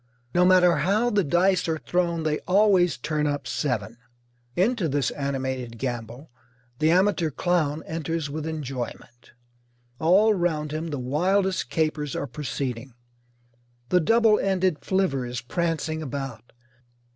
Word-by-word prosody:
No 180 +1 +4
matter 180 -3 +5
how 205 +10 +1
the 205 -2 +2
dice 180 +4 +2
are 160 -1 0
thrown 170 0 -1
they 155 -1 0
always 185 -4 +4
turn 150 +3 -1
up 145 -2 -2
seven. 115 -5 -2 0.6
Into 195 -2 +1
this 140 -2 0
animated 130 -4 -3
gamble 120 +2 -5 0.5
the 155 - +3
amateur 180 -1 +3
clown 160 -1 0
enters 160 -1 -3
with 155 +2 -5
enjoyment. 130 -5 -6 0.7
All 195 +7 +4
round 160 -5 -1
him 155 +2 -3
the 150 -3 -4
wildest 185 +9 0
capers 155 -3 -1
are - - -2
proceeding. 130 -2 -5 0.9
The 180 - +4
double 225 +5 +4
ended 185 -5 +1
flivver 185 -9 0
is 120 0 -4
prancing 160 +2 -2
about. 135 -5 -6
155 Hz, 130 wpm, -25 LUFS, 135-180 Hz, 0.9 s, matter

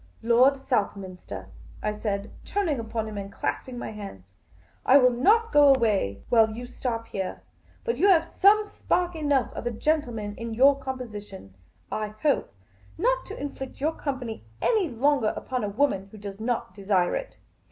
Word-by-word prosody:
Lord 250 +4 +5
Southminster," 185 - -3 0.3
I 210 - +1
said, 210 -1 -3
turning 345 -10 -1
upon 225 -1 -3
him 210 -1 -5
and 200 0 -7
clasping 250 +4 -3
my 240 - -5
hands, 95 - -10 0.2
' 90 +2 -29
' - - -36
I 265 - +7
will 250 -2 +6
not 425 - +3
go 290 -1 +7
away 210 - +1
while 225 -2 +5
you 245 +2 -6
stop 240 -2 -4
here. 190 -2 -4 0.4
But 470 - -1
you 395 - +4
have 335 -4 +5
some 410 +5 +4
spark 360 -4 -1
enough 290 -4 +1
of - - -4
a - - 0
gentleman 235 -5 -1
in 230 -1 -5
your 275 +3 +5
composi 250 -6 -5
tion, 145 - -12 0.4
I 215 0 -3
hope, 295 -3 +2 0.5
not - - +1
to - - -7
inflict 270 -2 -6
your 310 +4 0
company 255 - -4 0.2
any 415 -8 +2
longer 260 -1 +2
upon 255 -3 -3
a 205 - -1
woman 200 -4 0
who 215 - -11
does 200 -1 -8
not 230 -4 -2
desire 190 -2 +1
it. - - -5
240 Hz, 175 wpm, -26 LUFS, 205-285 Hz, 0.5 s, I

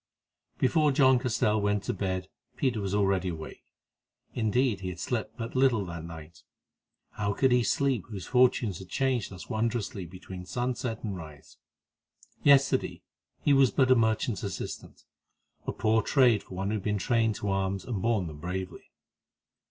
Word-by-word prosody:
Before 150 +2 +3
John 130 -2 +5
Castell 110 -3 +1
went 105 0 +1
to - - -2
bed 95 -1 -2 0.3
Peter 125 -6 0
was 100 0 -2
already 95 -2 +1
awake—indeed, 110 +7 -4
he 95 - -5
had 90 -2 -7
slept 110 0 -3
but 115 +1 -5
little 130 -6 +3
that 85 -2 -6
night. 80 0 -10 0.7
How 100 -1 -2
could 130 +5 +2
he 125 0 +4
sleep 130 -3 +1
whose 100 -4 -6
fortunes 125 - +2
had 95 -1 -11
changed 130 -1 0
thus 95 -1 -10
wondrously 110 -4 -2
between 90 +1 -9
sun 125 +3 -1
set 115 -2 -4
and 105 -4 -3
rise? 75 -5 -11 0.8
Yesterday 140 -1 +3 0.4
he 145 - +4
was 135 -2 +5
but 130 -2 +2
a - - +8
merchant's 110 -1 +1
assistant—a 95 -7 -8
poor 110 0 +2
trade 125 -7 +4
for 95 - -11
one 95 +2 -2
who 110 - 0
had 100 - -7
been 105 -1 0
trained 115 0 +1
to 105 - -3
arms, 95 -1 -1
and 110 -7 -3
borne 110 -4 +1
them 75 -3 -8
bravely. 90 +2 -5
105 Hz, 160 wpm, -28 LUFS, 95-125 Hz, 0.8 s, a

